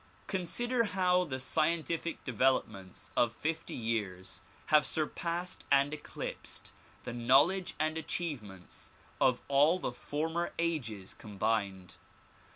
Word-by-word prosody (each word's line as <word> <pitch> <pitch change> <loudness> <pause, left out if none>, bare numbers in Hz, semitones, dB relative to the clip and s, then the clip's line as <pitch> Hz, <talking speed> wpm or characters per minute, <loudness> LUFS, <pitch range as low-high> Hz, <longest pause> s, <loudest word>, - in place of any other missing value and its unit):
Consider 230 +6 0
how 180 -2 +2
the 140 -6 -4
scien 155 +5 +1
tific 170 0 -2
developments 105 -7 0
of 120 - +3
fifty 160 +6 -3
years 95 -6 -3 0.3
have 150 -1 +8
surpassed 170 +3 -2
and 140 +1 +4
eclipsed 150 - -7 0.3
the 125 - -5
knowledge 135 +11 +4
and 155 +1 0
achievements 120 - -5 0.3
of 125 -1 +3
all 145 +5 +5
the 180 - -2
former 160 +7 -2
ages 120 - -2
combined. 100 -3 -2
145 Hz, 110 wpm, -32 LUFS, 110-170 Hz, 0.3 s, have